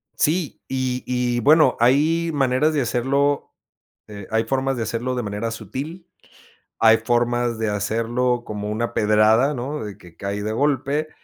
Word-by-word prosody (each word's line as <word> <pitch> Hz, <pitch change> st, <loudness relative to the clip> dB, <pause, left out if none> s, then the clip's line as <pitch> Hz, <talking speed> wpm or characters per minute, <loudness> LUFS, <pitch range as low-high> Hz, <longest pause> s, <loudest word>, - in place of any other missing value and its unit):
Sí, 160 Hz, 0 st, 0 dB
y-y 125 Hz, -2 st, -1 dB
bueno, 155 Hz, +6 st, +5 dB
hay 155 Hz, +7 st, +3 dB
maneras 140 Hz, +2 st, +2 dB
de 150 Hz, -, +1 dB
hacerlo, 135 Hz, +4 st, 0 dB, 0.5 s
eh, 100 Hz, -2 st, -9 dB
hay 110 Hz, 0 st, +2 dB
formas 135 Hz, +2 st, -1 dB
de 115 Hz, -, -1 dB
hacerlo 115 Hz, +3 st, -2 dB
de 125 Hz, -, -2 dB
manera 105 Hz, +2 st, -3 dB
sutil, 135 Hz, -, -7 dB, 0.7 s
hay 115 Hz, 0 st, +6 dB
formas 120 Hz, 0 st, 0 dB
de 110 Hz, -1 st, 0 dB
hacerlo 115 Hz, +4 st, -1 dB
como 105 Hz, -1 st, -5 dB
una 115 Hz, +2 st, -2 dB
pedrada, 110 Hz, +6 st, +3 dB
¿no? 135 Hz, +1 st, -4 dB
De 105 Hz, -2 st, -7 dB
que 85 Hz, -2 st, -16 dB
cae 100 Hz, +1 st, -4 dB
de 110 Hz, -, -2 dB
golpe, 145 Hz, +4 st, 0 dB
120 Hz, 150 wpm, -22 LUFS, 110-140 Hz, 0.7 s, hay